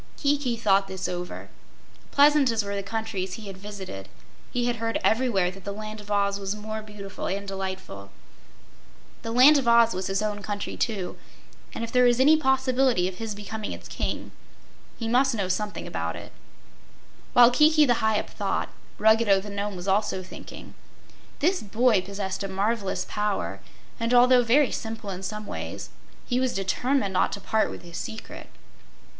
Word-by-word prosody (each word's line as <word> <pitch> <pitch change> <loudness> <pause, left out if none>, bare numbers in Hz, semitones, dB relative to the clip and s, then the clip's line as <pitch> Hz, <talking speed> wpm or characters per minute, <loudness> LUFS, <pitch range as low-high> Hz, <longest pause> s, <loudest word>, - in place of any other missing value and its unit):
Kiki 280 -4 0
thought 195 -3 +3
this 190 -1 -4
over. 180 0 -5 0.6
Pleasant 290 -1 +5
as 225 -3 0
were 200 - -3
the 200 - -2
countries 200 -2 -3
he 215 +2 -7
had 195 -1 -7
visited, 190 - -8 0.4
he 245 -1 0
heard 230 -1 -2
everywhere 220 -6 +2
that 195 0 -13
the 200 - -4
Land 215 +1 -7
of 205 - -14
Oz 200 -1 +1
was 195 +1 -3
more 215 +1 -5
beautiful 210 -2 -7
and 200 +1 -3
delightful. 190 - -6 1.1
The 230 - -5
Land 260 +6 +7
of 260 - -3
Oz 235 -1 +5
was 185 0 -3
his 195 +2 0
own 210 -1 -2
country, 205 0 -4
too, 200 -6 -2 0.5
and - - -5
if 230 - -5
there 250 0 +4
was 240 0 +4
any 295 +4 +7
possibility 265 - +2
of 185 -1 -7
his 225 -2 -4
becoming 210 +1 -5
its - - -10
King, - - -4 0.7
he 230 - -4
must 255 +2 +3
know 200 -4 -1
something 205 +3 -2
about - - -3
it. - - -9 1.0
While 245 0 +8
Kiki 305 +3 +5
the 240 -3 +2
Hyup 220 -1 0
thought, - - -2 0.3
Ruggedo 220 -2 +4
the 205 +1 -8
Nome 200 0 -3
was 180 +1 -7
also 195 -1 +1
thinking. 185 - -11 0.7
This 360 +5 +2
boy 220 0 +2
possessed 195 0 -4
a - - -2
marvelous 195 -1 -1
power, 210 -1 -2 0.4
and 230 +2 +1
although 250 +1 +6
very 255 +4 +4
simple 220 -3 -5
in 185 0 -6
some 210 +2 -5
ways, - - -6 0.3
he 250 -1 0
was 260 -1 0
determined 200 +3 0
not 185 - +2
to 200 - -4
part 220 +2 +1
with - - -9
his 170 -1 -8
secret. 220 - -7
210 Hz, 175 wpm, -26 LUFS, 195-240 Hz, 1.1 s, While